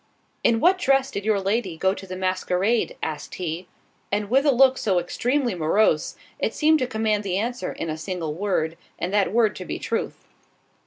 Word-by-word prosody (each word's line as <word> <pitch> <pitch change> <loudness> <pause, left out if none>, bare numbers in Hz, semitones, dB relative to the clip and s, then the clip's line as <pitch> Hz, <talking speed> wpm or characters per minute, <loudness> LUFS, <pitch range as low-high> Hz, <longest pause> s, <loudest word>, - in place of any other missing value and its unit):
"In 225 -1 +3
what 365 +7 +4
dress 270 -4 +2
did 200 - -4
your 215 -2 +2
lady 195 -3 -1
go 190 +3 +2
to 195 -1 -9
the 185 - -5
masquerade?" 185 +4 0
asked 155 -2 -4
he, 175 0 -4 0.4
and 205 +1 -1
with 270 +3 +4
a - - +6
look 260 0 +5
so 190 -4 +1
extremely 245 +8 0
morose, 165 0 +2 0.2
it - - -1
seemed 315 0 +4
to 255 - 0
command 220 -2 0
the 190 -2 -1
answer 240 +4 -2
in - - -5
a 155 -1 -3
single 165 -3 -3
word, 170 -3 -1 0.2
and 180 +3 -3
that 205 -2 +2
word 220 -1 +3
to - - -6
be - - -4
truth. - - -3
205 Hz, 195 wpm, -24 LUFS, 180-240 Hz, 0.4 s, a